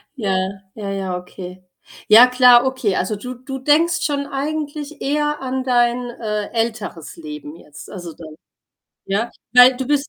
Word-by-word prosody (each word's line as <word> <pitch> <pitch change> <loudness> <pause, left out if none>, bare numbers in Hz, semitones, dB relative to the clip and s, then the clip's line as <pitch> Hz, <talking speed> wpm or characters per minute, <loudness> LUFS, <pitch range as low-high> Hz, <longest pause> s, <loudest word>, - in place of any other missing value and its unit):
ja. 200 -7 -1 0.4
Ja, 200 -2 -5
ja, 190 -2 -3
okay. 180 0 -10 0.4
Ja, 230 +4 +9
klar, 250 -1 +6
okay. 260 -7 -1
Also, 190 +4 -1
du 250 +5 -7
du 260 +2 -7
denkst 320 +6 +2
schon 280 -2 -1
eigentlich 295 +1 -5
eher 295 +1 -1
an 260 0 -3
dein, 245 -1 +1
äh, 210 -3 -4
älteres 220 -8 -3
Leben 150 -1 -9
jetzt, 150 -3 -13
also 175 -4 -8
dann, 155 -2 -12 0.7
ja? 210 +5 -1 0.2
Weil 250 +1 +7
du 260 0 -4
bist 290 +1 0
245 Hz, 155 wpm, -20 LUFS, 195-270 Hz, 0.7 s, Ja